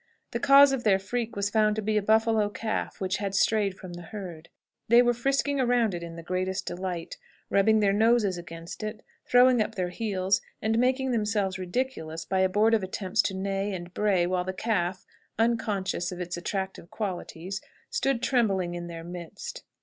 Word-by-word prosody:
The - - -2
cause 280 0 +7
of 265 -3 -1
their 200 -3 +4
freak 230 +4 -3
was 200 0 -1
found 215 -1 +3
to 220 - -2
be 215 +1 0
a 210 - +3
buffalo 220 0 +3
calf 220 +1 -3
which 190 0 -1
had 200 -1 -3
strayed 200 -2 +2
from 185 -2 -9
the 175 - -8
herd. 170 -3 -8 0.4
They 235 +2 +7
were 240 0 +3
frisking 275 +3 0
around 245 -4 +2
it 175 - -4
in 170 -1 -7
the 165 - -8
greatest 185 +2 -2
delight, 175 -1 -4 0.3
rubbing 215 +2 +4
their 200 -1 +3
noses 220 -2 +3
against 165 +1 -8
it, 215 +1 -5 0.2
throwing 245 -1 +5
up 220 +1 -2
their 180 -3 -1
heels, 195 -1 0 0.2
and 220 +1 +1
making 260 +1 +2
themselves 210 -4 0
ridiculous 175 -5 -3
by 190 - 0
abortive 210 +4 +3
attempts 190 0 0
to 195 - -2
neigh 195 +1 -2
and 175 0 -8
bray, 195 -4 +2
while 180 0 0
the 185 +1 -4
calf, 185 -3 -1 0.3
unconscious 210 -6 0
of 180 - -7
its 175 -1 -4
attractive 190 0 -4
qualities, 190 -2 -5 0.3
stood 270 - 0
trembling 195 -9 +1
in 175 0 -5
their 165 -1 -7
midst." 175 -1 -7
200 Hz, 180 wpm, -27 LUFS, 180-225 Hz, 0.4 s, cause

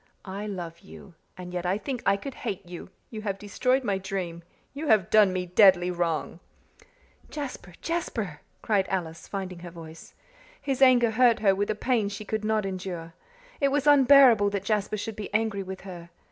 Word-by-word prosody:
I 200 +2 -5
love 175 -4 -6
you 190 -1 -14 0.2
and 180 -1 -8
yet 175 -1 -3
I 180 +2 0
think 250 +2 -5
I 200 0 +4
could 275 +6 -7
hate 200 -5 -5
you 175 0 -9 0.2
you 220 -2 -6
have 200 -2 -3
destroyed 250 +6 0
my 200 -4 -1
dream 185 -3 -4 0.3
you 295 +3 -5
have 215 -7 +3
done 210 -3 +6
me 185 0 -2
deadly 180 -1 +5
wrong." 170 -1 -2 0.9
"Jasper! 260 - -7
Jasper!" 225 - -3 0.2
cried 200 -3 +1
Alice, 170 -3 -4
finding 185 -3 -5
her 175 0 -9
voice. 165 -1 -12 0.4
His 270 -2 -3
anger 245 -3 +6
hurt 240 0 +4
her 195 -3 +4
with 200 +1 -2
a 215 - 0
pain 220 -2 0
she 205 +1 -7
could 215 0 -3
not 215 -1 0
endure. 180 -3 -5 0.5
It 280 - +3
was 285 0 0
unbearable 270 -7 +6
that 200 -1 -3
Jasper 210 0 -1
should 215 +1 -5
be 210 - -7
angry 215 -2 0
with 190 0 -7
her. 175 -3 -10
200 Hz, 185 wpm, -26 LUFS, 180-225 Hz, 0.9 s, done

